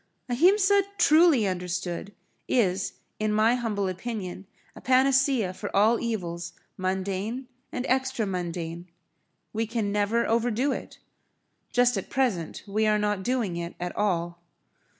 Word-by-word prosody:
Ahimsa 380 - +4 0.2
truly 310 - +5
understood 180 +1 -3 0.3
is 195 -6 +1 0.3
in 215 0 0
my 215 +2 +4
humble 220 -5 -1
opinion 190 -1 -5 0.3
a - - -11
panacea 260 -5 +3
for - - -6
all 220 +4 +4
evils 175 -7 -3 0.2
mundane 190 +6 -2 0.2
and 255 0 -3
extra 260 -3 +1
mundane. 175 -2 -4 0.6
We 225 +1 -1
can 220 -3 -1
never 210 +3 +1
overdo 235 +4 +1
it. - - -6 0.7
Just 245 -2 +3
at 195 - -5
present 235 - -1
we 215 +2 0
are 210 0 +3
not 210 -2 0
doing 220 -5 -1
it 170 0 -5
at 180 0 -4
all. 175 -4 -1
210 Hz, 130 wpm, -27 LUFS, 185-245 Hz, 0.7 s, truly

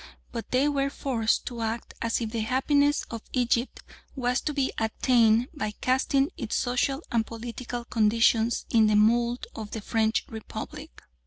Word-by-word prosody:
But 230 -1 -6
they 260 +3 +2
were 275 -1 +1
forced 240 -6 0
to 235 -2 -5
act 225 +1 -3
as 230 +1 0
if 225 -2 -3
the 230 - -2
happiness 285 +5 +2
of 230 -1 -5
Egypt 245 0 0 0.3
was 250 -1 0
to 300 - -2
be 275 -2 0
attained 230 +1 +3
by 215 -9 -4
casting 270 +2 +2
its 230 -4 -3
social 270 +4 0
and 230 -2 +2
political 235 +1 -6
conditions 225 +1 +2
in 220 -2 +5
the 215 - +3
mould 235 +3 +3
of 215 -2 -6
the 220 - -5
French 220 +1 0
Republic. 220 - -8
235 Hz, 160 wpm, -27 LUFS, 225-260 Hz, 0.3 s, in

